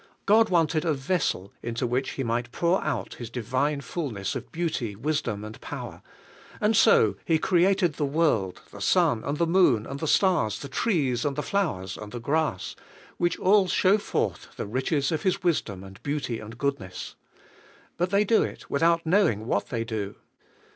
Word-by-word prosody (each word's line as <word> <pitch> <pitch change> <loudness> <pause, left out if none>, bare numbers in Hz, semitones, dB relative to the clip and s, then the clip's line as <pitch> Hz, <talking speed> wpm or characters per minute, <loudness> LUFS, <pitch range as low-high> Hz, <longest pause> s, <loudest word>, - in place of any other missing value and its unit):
God 220 +2 +5
wanted 165 -3 +2
a 160 -3 +1
vessel 135 - -1
into 120 +1 -2
which 125 +2 -1
He 135 - -3
might 120 0 -2
pour 170 +6 +1
out 125 -10 -2
His 120 -3 -8
divine 130 +5 -1
fullness 120 - -4
of - - -6
beauty, 155 -11 -2
wisdom 115 -4 -2
and 110 +1 -9
power; - - -7 0.6
and 215 +1 +2
so 105 - +5
He 165 - +2
created 180 0 +2
the 145 - -1
world, 140 - +1
the - - -10
sun, 115 - +3
and 145 +1 -2
the 170 - +2
moon, 165 - +3
and 140 +1 -6
the 160 - -2
stars, 145 - +3
the 140 - -7
trees, 140 - 0
and 145 -2 -1
the 150 - -2
flowers, 135 - -1
and 105 -1 -8
the 120 - -5
grass, 140 -5 -1 0.4
which 175 0 +1
all 195 0 +4
show 190 +3 +3
forth - - -2
the - - -3
riches 135 +6 0
of 160 - -1
His 190 0 0
wis 175 -3 +3
dom, 95 -3 -9
and 95 0 -12
beauty, 140 -5 -2
and 110 +2 -10
goodness. 125 -10 -3 0.8
But 180 +1 0
they 200 +2 +3
do 220 +2 +3
it - - -5
without 165 +3 +2
knowing 160 - +2
what 100 -3 0
they 115 -2 -2
do. 105 -3 -4
140 Hz, 180 wpm, -26 LUFS, 115-170 Hz, 0.8 s, God